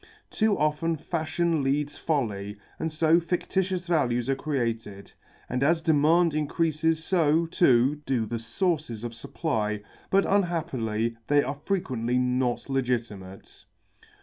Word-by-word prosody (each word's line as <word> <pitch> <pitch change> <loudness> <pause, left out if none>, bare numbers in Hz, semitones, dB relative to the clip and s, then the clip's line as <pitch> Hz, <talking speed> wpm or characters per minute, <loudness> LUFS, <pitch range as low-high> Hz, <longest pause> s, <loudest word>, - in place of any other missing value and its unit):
Too 220 -2 +2
often 155 +2 0
fashion 165 0 -1
leads 145 +2 0
folly, 105 -9 -2 0.2
and 160 0 -2
so 160 +2 +4
fictitious 180 +2 -1
values 125 -8 +1
are - - +1
created, 115 -8 -3 0.4
and 125 +1 -2
as 160 +3 +2
demand 160 +2 +4
increases 160 +1 0
so, 165 -2 +2
too, 145 -4 +3
do 120 -4 +1
the 115 +2 -4
sources 120 - -2
of 120 -1 -4
supply, 110 -4 -2 0.3
but 195 +1 +3
unhappily 125 - 0
they 145 0 +4
are 140 +1 -5
frequently 125 - 0
not 125 -1 0
legitimate. 115 -8 -4
145 Hz, 120 wpm, -26 LUFS, 120-165 Hz, 0.4 s, so